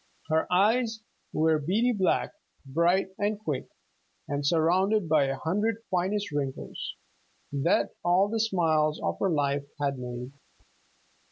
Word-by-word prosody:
Her 160 +2 +1
eyes 220 +4 +2 0.3
were 160 0 +2
beady 205 +12 +1
black, 190 -6 +1 0.3
bright 170 +7 +2
and 205 +1 0
quick, 150 -10 -3 0.6
and 145 0 -2
surrounded 180 +6 +2
by 155 -3 +4
a 135 0 -2
hundred 210 +9 -1
finest 190 +2 0
wrinkles, 140 -2 -4 0.6
that 140 +4 +1
all 180 +3 +4
the 225 +2 -2
smiles 160 -8 +2
of - - -2
her 195 - +2
life 140 -3 0
had 140 -2 -1
made. 125 +1 -6
170 Hz, 125 wpm, -28 LUFS, 145-205 Hz, 0.6 s, by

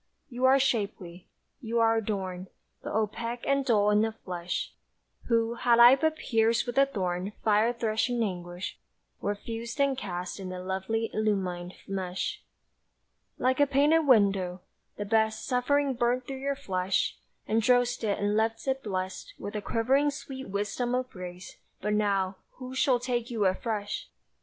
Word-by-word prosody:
You 250 +1 0
are 265 +1 +7
shapely, 200 -9 -1 0.3
you 230 -1 -1
are 225 0 +4
adorned, 190 -4 -3 0.3
But - - -5
opaque 230 +2 -2
and 275 0 +2
dull 210 -5 +3
in 210 0 +4
the 225 0 +1
flesh, 180 -4 -4 0.5
Who, 230 -1 +2
had 235 0 +3
I 240 +2 +9
but 315 +3 +1
pierced 225 -4 +1
with 245 -1 -4
the 275 0 +6
thorned 185 -4 -2
Fire 215 +2 +4
threshing 235 +1 0
anguish, 175 -2 -5 0.4
were 205 - -1
fused 230 +5 -6
and 280 -1 +3
cast 180 -5 -5
In 185 -1 -5
a 185 - -5
lovely 190 +5 -2
illumined 185 -4 -1
mesh. 190 - -3 1.0
Like 255 +1 +1
a 285 - +5
painted 295 +3 +3
window: 195 -6 +3 0.4
the 205 - -3
best 220 +1 +1
Suffering 275 +2 +1
burnt 245 +1 0
through 270 0 -5
your 280 +1 -1
flesh, 190 -8 -1 0.3
Undrossed 245 +2 +2
it 205 -2 +1
and 205 +1 0
left 225 +3 0
it 265 0 0
blest 190 - -4
With 205 - -6
a 210 - -2
quivering 265 +8 +2
sweet 270 -4 -7
wisdom 210 +5 -1
of 255 0 -2
grace: 180 -1 -9 0.2
but 210 +2 -1
now 200 -2 +1 0.2
Who 255 0 -8
shall 260 -1 +3
take 240 -1 -2
you 225 -4 0
afresh? 205 +2 -2
225 Hz, 155 wpm, -28 LUFS, 195-250 Hz, 1.0 s, I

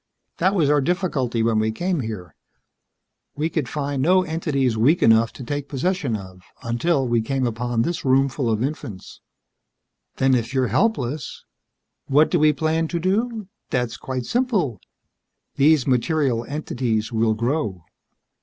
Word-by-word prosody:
That 190 +3 +2
was 165 -6 +3
our 145 0 +3
difficulty 135 -9 0
when 115 -1 +2
we 110 0 +1
came 175 +8 -1
here. 105 - -6 1.0
We 155 +3 -1
could 145 -8 -2
find 140 -2 -2
no 185 +6 +4
entities 150 -7 -1
weak 135 +11 +3
enough 115 0 +5
to 130 - -9
take 145 +3 -4
possession 140 -3 -1
of 95 -2 -9 0.2
until 130 +4 0
we 120 -1 +2
came 130 +3 -1
upon 120 0 -1
this 170 +4 -3
roomful 135 -1 +2
of 110 +1 0
infants." 125 -9 -6 0.9
"Then, 135 0 +2
if 120 +1 -1
you're 130 -3 +2
helpless 145 - -1 0.3
..." - - -56
"What 150 +3 +4
do 175 - +3
we 155 0 +5
plan 160 +2 0
to 170 +1 -2
do? 215 +4 -1 0.2
That's 125 -2 -1
quite 130 -2 -5
simple. 210 - 0 0.8
These 145 -1 +4
material 130 -2 +1
entities 125 -6 -2
will 110 -1 +1
grow. 115 - -2
135 Hz, 150 wpm, -22 LUFS, 115-160 Hz, 1.0 s, enough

